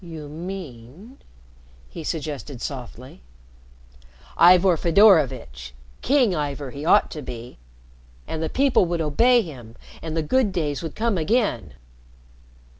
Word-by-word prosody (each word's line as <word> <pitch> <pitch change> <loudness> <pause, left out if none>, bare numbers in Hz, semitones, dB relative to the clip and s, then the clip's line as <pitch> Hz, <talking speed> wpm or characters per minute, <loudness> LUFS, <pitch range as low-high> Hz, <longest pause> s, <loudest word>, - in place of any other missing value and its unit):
"You 160 -4 -9
mean 170 - -9 0.4
?" - - -27
he 165 - -6
suggested 150 -4 -5
softly. 125 - -8 1.1
"Ivor 180 +1 +6
Fedorovitch. 145 - +2 0.3
King 255 -6 +2
Ivor 145 -3 -4
he 140 +3 -8
ought 205 +6 +3
to 155 - -6
be. 120 - -9 0.7
And 160 - -5
the 160 - -2
people 270 - +2
would 170 0 -2
obey 235 +11 +3
him, 120 -8 -11 0.3
and 160 0 -5
the 160 - 0
good 240 +5 +1
days 150 -6 -2
would 165 -2 -7
come 225 -4 0
again." 165 - -1
155 Hz, 125 wpm, -23 LUFS, 130-190 Hz, 1.1 s, Ivor